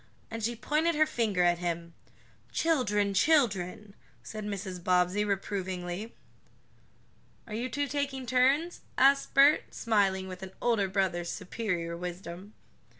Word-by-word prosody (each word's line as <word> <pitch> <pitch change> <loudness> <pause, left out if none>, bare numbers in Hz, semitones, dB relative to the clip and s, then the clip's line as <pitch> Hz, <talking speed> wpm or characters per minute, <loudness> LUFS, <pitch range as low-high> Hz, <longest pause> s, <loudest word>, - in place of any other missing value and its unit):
and 225 -1 -5
she 235 +2 0
pointed 305 +8 +1
her 310 +1 +5
finger 220 -10 0
at 175 -1 +3
him. 170 -1 -3 0.6
"Children 210 -11 +1
children," 205 - +2 0.3
said 215 -1 -7
Mrs. 195 -3 -5
Bobbsey, 180 +3 +2
reprovingly. 195 0 -3 1.3
"Are 220 - -9
you 240 +4 -2
two 285 +4 -1
taking 275 -1 -2
turns?" 270 +8 +2 0.2
asked 275 +1 +4
Bert, 280 +2 +6
smiling 195 -4 +1
with 185 0 -8
an 190 0 -8
older 225 -5 +2
brother's 185 -3 -1
superior 180 -4 -3
wisdom. 180 +3 -7
205 Hz, 125 wpm, -29 LUFS, 180-250 Hz, 1.3 s, Bert